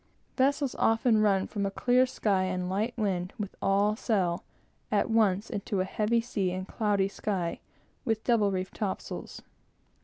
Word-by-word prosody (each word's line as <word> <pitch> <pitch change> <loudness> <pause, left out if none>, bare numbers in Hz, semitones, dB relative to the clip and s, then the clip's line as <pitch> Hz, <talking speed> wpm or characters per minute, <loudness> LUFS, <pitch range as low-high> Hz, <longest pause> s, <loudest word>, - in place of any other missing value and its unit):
Vessels 280 0 +2
often 225 0 +3
run 195 -3 +3
from 205 -2 -3
a 195 - +1
clear 250 +5 +3
sky 195 -6 +1
and 185 -1 -2
light 215 +5 -1
wind, 185 -5 -1
with 205 -3 -4
all 200 +2 +2
sail, 190 -7 0 0.5
at 210 +1 +1
once 210 -3 +3
into 205 -3 -3
a 185 - +1
heavy 215 +4 +1
sea 210 -6 -1
and 185 +1 -4
cloudy 205 -3 +1
sky, 190 -4 -3 0.4
with 225 -1 -1
double 225 -4 +3
reefed 185 0 -3
topsails. 200 -3 -5
205 Hz, 155 wpm, -29 LUFS, 190-225 Hz, 0.5 s, often